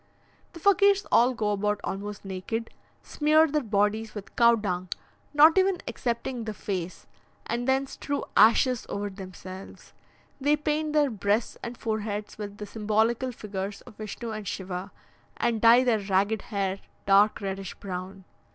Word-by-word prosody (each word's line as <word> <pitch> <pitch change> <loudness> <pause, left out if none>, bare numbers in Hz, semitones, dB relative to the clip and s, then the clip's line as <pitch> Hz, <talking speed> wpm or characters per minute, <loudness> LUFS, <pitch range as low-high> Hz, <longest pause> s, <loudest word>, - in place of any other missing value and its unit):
The 335 - -10
Fakirs 400 +2 +4
all 245 +2 +4
go 210 -2 0
about 210 0 0
almost 205 +1 -5
naked, 195 +4 -4 0.3
smear 310 +1 +3
their 305 -1 0
bodies 215 0 0
with 205 -2 -9
cow 235 -1 +6
dung, 185 -4 -3 0.4
not 310 +5 +7
even 380 -1 +2
excepting 240 0 -3
the 215 -1 -4
face; 185 -3 -5 0.4
and 240 +1 -2
then 265 +1 +2
strew 285 +1 -4
ashes 240 +2 +4
over 205 0 -3
themselves. 190 0 -10 0.5
They 290 +2 +3
paint 300 0 -1
their 295 -3 +3
breasts 205 +1 0
and 240 0 -6
foreheads 215 -2 -4
with 205 -1 -6
the 210 - -6
symbolical 220 +4 0
figures 200 -3 -5
of 215 - -15
Vishnu 220 +2 -6
and 215 -2 -6
Shiva, 185 +1 -5 0.5
and 230 -2 0
dye 235 +2 +7
their 235 -4 +2
ragged 200 +2 +1
hair 195 -3 -1 0.3
dark 200 +2 +5
reddish 195 -1 -5
brown. 190 0 -7
215 Hz, 150 wpm, -27 LUFS, 200-250 Hz, 0.5 s, not